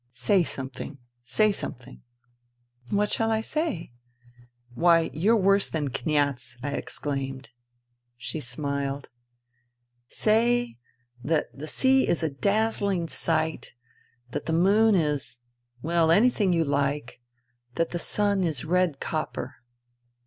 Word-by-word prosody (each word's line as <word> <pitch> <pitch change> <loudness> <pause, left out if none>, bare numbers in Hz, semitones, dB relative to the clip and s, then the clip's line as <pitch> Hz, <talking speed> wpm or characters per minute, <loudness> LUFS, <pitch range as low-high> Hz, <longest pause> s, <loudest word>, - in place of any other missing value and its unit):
" - - -44 0.2
Say 200 -3 +6
something! 135 -1 -4 0.2
Say 210 - +2
something! 130 -10 -7 0.3
" 120 0 -45
" 120 0 -47
What 205 0 +1
shall 225 0 +1
I 220 0 +1
say? 305 - -3 0.3
" 120 0 -25
" 120 0 -30
Why, 165 +3 +3
you're 205 +9 +3
worse 195 0 +3
than 150 -4 -2
Kniaz! 135 -3 -1
" - - -15
I 145 - -2
exclaimed. 135 -3 -4 0.7
She 125 +6 -5
smiled. 140 +1 -4 0.6
" 120 0 -50 0.2
Say 235 - +1 0.4
that 155 +2 -1
the 150 +3 -7
sea 265 +8 +3
is 170 - 0
a 160 - 0
dazzling 200 - 0
sight, 160 -3 -1 0.6
that - - -4
the 160 - 0
moon 200 +6 +4
is... 150 -7 -1 0.4
well, 165 0 +2
anything 205 +1 +4
you 165 -2 +2
like, 140 -3 -1 0.5
that 165 0 0
the 175 - -2
sun 200 +1 +1
is 155 -6 -1
red 180 -3 +1
copper.' 155 -1 -4
160 Hz, 135 wpm, -26 LUFS, 135-200 Hz, 0.7 s, Say